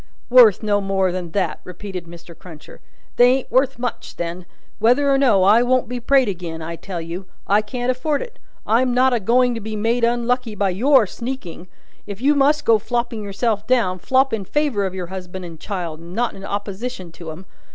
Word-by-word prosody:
"Worth 230 -6 +7
no 205 -1 +1
more 195 -1 0
than 180 -1 -4
that," 180 -6 -1
repeated 180 -1 -7
Mr. 170 0 -12
Cruncher. 160 -4 -13 0.4
"They 245 - +7
ain't 265 0 -3
worth 260 +1 +2
much, 245 0 -5
then. 175 +1 -5 0.3
Whether 250 +6 +3
or 275 - +4
no, 220 -9 +4
I 210 +5 +6
won't 255 +1 +2
be 245 +1 -4
prayed 265 +1 +3
agin, 175 -4 -5
I 165 +1 -5
tell 175 +2 -6
you. 170 +3 -7 0.2
I 205 +2 +3
can't 245 +4 -2
afford 280 +4 -1
it. - - -13 0.3
I'm 245 +3 +2
not 255 +1 +4
a 240 - +2
going 245 +4 +2
to 230 - -5
be 215 +1 -5
made 230 +3 0
unlucky 240 -1 0
by 200 -1 +1
your 255 +5 +4
sneaking. 200 -5 -7 0.4
If 200 -1 -7
you 280 +4 +3
must 295 +1 +2
go 225 -1 +5
flopping 235 0 -2
yourself 205 +1 -2
down, 225 -8 +1
flop 265 +6 +2
in 215 -3 -1
favour 235 -3 0
of 190 - -7
your 185 -1 -4
husband 185 0 -7
and 165 -2 -10
child, 175 -6 -5
and 170 +2 -10
not 240 +1 0
in 195 - -11
opposition 200 -1 -5
to 165 0 -10
'em. 160 +4 -9
215 Hz, 205 wpm, -21 LUFS, 185-250 Hz, 0.4 s, Worth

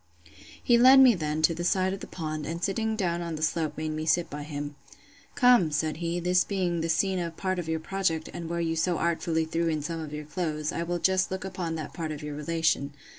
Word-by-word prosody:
He 240 -2 +4
led 260 +2 +8
me, 260 -2 +8
then, 155 -4 -2
to 165 - +5
the 170 +1 -4
side 185 +1 +1
of 195 - -5
the - - -8
pond; 155 -3 -5
and 170 +2 -4
sitting 220 +2 0
down 175 -5 -1
on 170 -1 -4
the 155 - -4
slope, 155 -1 -1
made 155 0 -2
me 155 0 -4
sit 175 +1 +2
by 145 +1 -5
him. 145 -1 -5 0.6
Come, 245 - +5
said 155 +1 -1
he, 170 +1 -2
this 180 +1 +3
being 180 -4 -1
the 165 - -2
scene 185 +3 +1
of 170 -2 -4
part 185 -1 -1
of 165 -2 -5
your 160 0 0
project, 165 -2 -1
and 170 -1 -6
where 170 0 -2
you 165 -1 0
so 170 +1 +1
artfully 165 -1 0
threw 165 +1 -1
in 155 -2 -1
some 165 +2 -4
of 155 -2 -6
your 150 0 -6
clothes, 155 -2 -2
I - - -3
will 175 +1 -1
just 190 +2 +2
look 190 0 -4
upon 180 -3 -4
that 155 -2 -6
part 160 -2 -4
of 150 -1 -6
your 150 0 -5
relation. 150 -2 0
165 Hz, 245 wpm, -27 LUFS, 155-185 Hz, 0.6 s, led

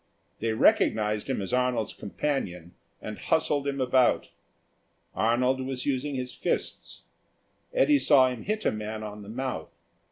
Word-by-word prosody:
They 115 0 0
recognised 105 0 +2
him 130 -7 -1
as 95 - -5
Arnold's 125 -3 +1
companion, 95 - -3 0.3
and 105 -1 -6
hustled 145 -3 +1
him 140 -1 -2
about. 130 0 +3 0.8
Arnold 125 +6 +2
was 130 -1 -4
using 140 +1 -1
his 125 -1 -3
fists. - - -3 0.7
Eddy 310 -13 +4
saw 135 - +6
him 125 -3 -5
hit 215 +2 -2
a - - +3
man 110 0 -5
on 105 0 -7
the 100 - -10
mouth. 125 -8 -4
125 Hz, 140 wpm, -27 LUFS, 105-135 Hz, 0.8 s, saw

